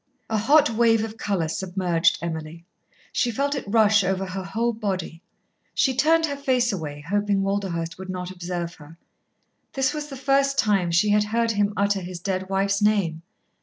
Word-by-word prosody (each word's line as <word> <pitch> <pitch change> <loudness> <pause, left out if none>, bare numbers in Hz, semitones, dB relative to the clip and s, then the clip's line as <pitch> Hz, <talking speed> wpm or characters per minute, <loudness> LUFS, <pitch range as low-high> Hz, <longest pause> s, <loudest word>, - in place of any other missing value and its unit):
A 220 - +2
hot 280 +4 +4
wave 225 -1 +3
of 220 0 -5
colour 190 -6 -1
submerged 180 -1 0
Emily. 165 0 -5 0.5
She 245 - +1
felt 280 +5 -1
it 275 - -3
rush 215 -1 +4
over 190 +1 -1
her 190 0 -5
whole 230 +5 -1
body. 190 -6 -4 0.5
She 265 - +2
turned 320 +4 +4
her 285 -3 -3
face 255 -4 +1
away, 145 -5 -6
hoping 205 0 +1
Walderhurst 185 -4 -2
would 190 0 -8
not 180 0 -4
observe 175 -1 -4
her. 155 +3 -14 0.8
This 270 -1 +1
was 300 -1 -4
the 275 -2 -8
first 275 +1 +2
time 200 -5 +2
she 175 +5 +3
had 210 0 +3
heard 230 +2 0
him 205 -1 +1
utter 200 -1 +1
his 180 0 -7
dead 190 +1 -3
wife's 195 +1 +1
name. 200 -7 +1
200 Hz, 175 wpm, -24 LUFS, 180-230 Hz, 0.8 s, hot